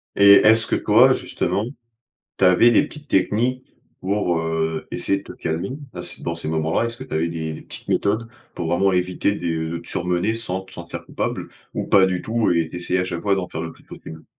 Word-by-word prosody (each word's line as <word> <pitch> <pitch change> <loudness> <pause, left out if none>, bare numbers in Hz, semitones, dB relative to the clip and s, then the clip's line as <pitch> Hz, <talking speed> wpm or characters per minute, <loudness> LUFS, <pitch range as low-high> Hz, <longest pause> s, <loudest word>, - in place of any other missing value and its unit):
Et 100 0 +7
est-ce 110 +2 +6
que - - +1
toi, 120 +5 +5
justement, 105 -4 -1 0.7
tu - - -1
avais 90 +6 +6
les 120 - +4
petites 150 -1 -11
techniques 120 +6 0 0.3
pour, 95 -3 0
heu, 80 -1 -2
essayer 100 - 0
de - - -16
te - - -10
calmer, 85 +6 -3 0.2
à 90 - -6
ces 90 0 -5
dans 85 - -2
ces 85 - -6
moments-là, 80 +7 0
est-ce 115 0 -4
que - - -7
tu - - -9
avais 80 +2 +1
des 80 -1 -4
des - - -9
petites - - -10
méthodes 110 +3 0 0.3
pour 85 -2 -4
vraiment 95 +4 +2
éviter 90 +2 0
de 80 -3 -2
de 85 - -3
te 85 - -15
surmener 90 +4 0
sans 95 -5 -2
te 95 - -17
sentir 85 0 -8
coupable? - - -4 0.2
Ou - - -3
pas 95 -2 +6
du 90 -1 -1
tout 115 0 0
et 85 -2 +1
tu - - -9
essayais 90 +1 -1
à 90 - 0
chaque 85 -2 -4
fois 100 -1 +2
d'en 95 -2 -2
faire 80 - -5
le 80 - -5
plus - - -20
possible? 80 0 -11
90 Hz, 230 wpm, -22 LUFS, 85-105 Hz, 0.7 s, Et